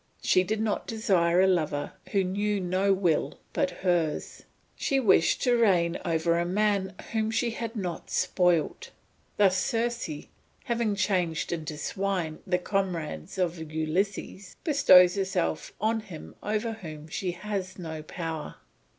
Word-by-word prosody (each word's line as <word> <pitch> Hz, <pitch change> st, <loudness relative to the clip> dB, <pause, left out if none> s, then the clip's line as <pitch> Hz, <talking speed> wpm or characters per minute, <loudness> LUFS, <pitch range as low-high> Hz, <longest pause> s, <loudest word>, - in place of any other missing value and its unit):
She 185 Hz, -, +4 dB
did 215 Hz, +4 st, -2 dB
not 220 Hz, -1 st, -1 dB
desire 185 Hz, -6 st, +2 dB
a 190 Hz, -, +5 dB
lover 155 Hz, -6 st, 0 dB, 0.2 s
who 195 Hz, -1 st, +2 dB
knew 205 Hz, +2 st, 0 dB
no 185 Hz, +2 st, +1 dB
will 185 Hz, -5 st, +1 dB, 0.2 s
but -, -, +1 dB, 0.2 s
hers. 170 Hz, -4 st, 0 dB, 0.3 s
She 275 Hz, -, +1 dB
wished 195 Hz, -9 st, +3 dB
to 245 Hz, -2 st, +4 dB
reign 180 Hz, -7 st, +3 dB
over 170 Hz, +1 st, +1 dB
a -, -, +1 dB
man 195 Hz, +1 st, 0 dB, 0.2 s
whom 220 Hz, -1 st, 0 dB
she 230 Hz, +1 st, 0 dB
had 230 Hz, 0 st, -5 dB
not 180 Hz, -5 st, -4 dB
spoilt. 175 Hz, -3 st, +1 dB, 0.5 s
Thus 190 Hz, -2 st, +4 dB
Circe, 235 Hz, -3 st, -1 dB, 0.5 s
having 235 Hz, -3 st, 0 dB
changed 180 Hz, -6 st, 0 dB
into 160 Hz, -2 st, -4 dB
swine 180 Hz, -1 st, -2 dB
the 180 Hz, -1 st, +2 dB
comrades 180 Hz, -, -3 dB
of 175 Hz, -2 st, 0 dB
Ulysses, 185 Hz, +4 st, -2 dB
bestowed 185 Hz, -, +6 dB
herself 190 Hz, -3 st, -1 dB
on 225 Hz, +2 st, +1 dB
him 190 Hz, -8 st, -10 dB
over 215 Hz, +2 st, -1 dB
whom 155 Hz, -8 st, -9 dB
she 180 Hz, +3 st, -3 dB
had 185 Hz, 0 st, -4 dB
no 160 Hz, -3 st, -6 dB
power. 160 Hz, -1 st, -5 dB
185 Hz, 140 wpm, -28 LUFS, 170-210 Hz, 0.5 s, bestowed